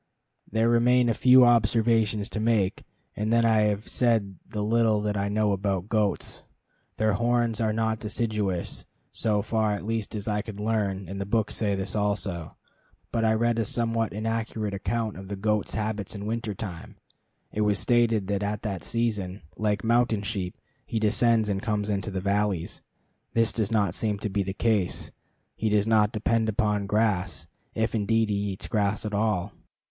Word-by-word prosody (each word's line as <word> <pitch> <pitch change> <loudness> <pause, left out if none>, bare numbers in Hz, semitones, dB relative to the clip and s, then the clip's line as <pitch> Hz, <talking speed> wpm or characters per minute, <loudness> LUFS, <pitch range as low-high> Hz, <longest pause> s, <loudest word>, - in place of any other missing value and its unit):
There 110 +2 +2
remain 120 +1 +4
a - - +3
few 125 +3 +7
observations 115 -2 +3
to 110 - -3
make, 110 -4 +1 0.3
and 105 +1 -1
then 115 0 +4
I 110 -1 +4
have 105 0 -1
said 110 -6 +1
the 105 -1 -3
little 110 0 +3
that 105 0 -1
I 100 0 -1
know 105 0 +1
about 100 0 -1
goats. 105 -3 -1 0.6
Their 110 -1 +2
horns 120 +1 +1
are 110 -1 +2
not 110 0 0
deciduous, 105 -4 -2 0.2
so 105 -2 0
far 110 -1 +1
at 100 - -5
least 110 -1 -2
as 105 0 -4
I 105 -1 0
could 105 -1 -8
learn, 105 -3 -1
and 100 +2 -5
the - - -2
books 110 0 0
say 100 -3 0
this 95 0 -3
also. 100 -5 -2 0.6
But 115 -1 0
I 110 0 +3
read 120 +1 +1
a - - +2
somewhat 115 +1 0
inaccurate 110 -1 -2
account 110 +2 -2
of 95 0 -9
the 100 - -4
goat's 105 +1 -1
habits 110 -2 -3
in 100 0 -6
winter 110 -1 -3
time. 90 -6 -7 0.6
It 105 - -2
was 105 -1 +2
stated 115 -3 +2
that 100 0 -1
at 105 0 -2
that 100 -6 -3
season, 105 -6 -2
like 105 -2 0
mountain 115 -2 +2
sheep, 95 -4 -3 0.3
he 115 - -4
descends 110 +1 +3
and 100 -1 -1
comes 105 -2 -1
into 100 0 -2
the 95 -2 -3
valleys. 100 -3 -1 0.5
This 115 0 +3
does 110 -2 -1
not 100 -6 +2
seem 105 0 -1
to 105 - -2
be 100 +1 0
the 95 0 -2
case. 105 -6 0 0.4
He 110 - -1
does 105 -1 +2
not 110 -2 +3
depend 110 0 +1
upon 105 -1 0
grass, 95 -7 0 0.3
if 110 +1 0
indeed 110 0 +1
he - - +1 0.2
eats 95 - -6
grass 105 -1 0
at 105 - -3
all. 100 -2 0
105 Hz, 180 wpm, -26 LUFS, 100-115 Hz, 0.6 s, few